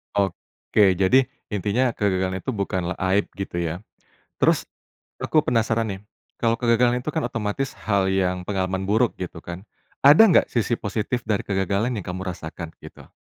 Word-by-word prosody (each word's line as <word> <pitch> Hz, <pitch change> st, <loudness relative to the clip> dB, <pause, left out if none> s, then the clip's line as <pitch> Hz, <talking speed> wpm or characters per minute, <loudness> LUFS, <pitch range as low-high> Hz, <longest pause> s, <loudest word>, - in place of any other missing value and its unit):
Oke. 100 Hz, 0 st, +1 dB
Jadi 115 Hz, +8 st, +4 dB, 0.2 s
intinya 105 Hz, +5 st, +1 dB
kegagalan 95 Hz, -3 st, -1 dB
itu 115 Hz, -, -5 dB
bukanlah 95 Hz, -3 st, -2 dB, 0.2 s
aib 100 Hz, +1 st, +2 dB
gitu 95 Hz, -3 st, -4 dB
ya. 85 Hz, +4 st, -3 dB, 0.5 s
Terus -, -, +2 dB, 0.5 s
aku 155 Hz, -, +2 dB
penasaran 115 Hz, -2 st, +1 dB
nih. 95 Hz, -1 st, -5 dB, 0.4 s
Kalau 115 Hz, -1 st, +2 dB
kegagalan 120 Hz, +1 st, +3 dB
itu 155 Hz, -, -3 dB
kan 160 Hz, -, -2 dB
otomatis 115 Hz, +5 st, -3 dB
hal 100 Hz, -3 st, 0 dB
yang 90 Hz, -1 st, 0 dB
pengalaman 95 Hz, -1 st, -1 dB
buruk 110 Hz, +3 st, +2 dB
gitu 90 Hz, -2 st, -6 dB
kan? 85 Hz, +3 st, -8 dB, 0.4 s
Ada 145 Hz, +9 st, +9 dB
nggak 170 Hz, -, +5 dB
sisi 120 Hz, 0 st, +1 dB
positif 110 Hz, +3 st, -2 dB
dari 105 Hz, -2 st, +1 dB
kegagalan 100 Hz, +3 st, 0 dB
yang 100 Hz, -, -5 dB
kamu 90 Hz, +1 st, -4 dB
rasakan, 80 Hz, -1 st, -7 dB
gitu? -, -, -13 dB
100 Hz, 155 wpm, -23 LUFS, 95-115 Hz, 0.5 s, Ada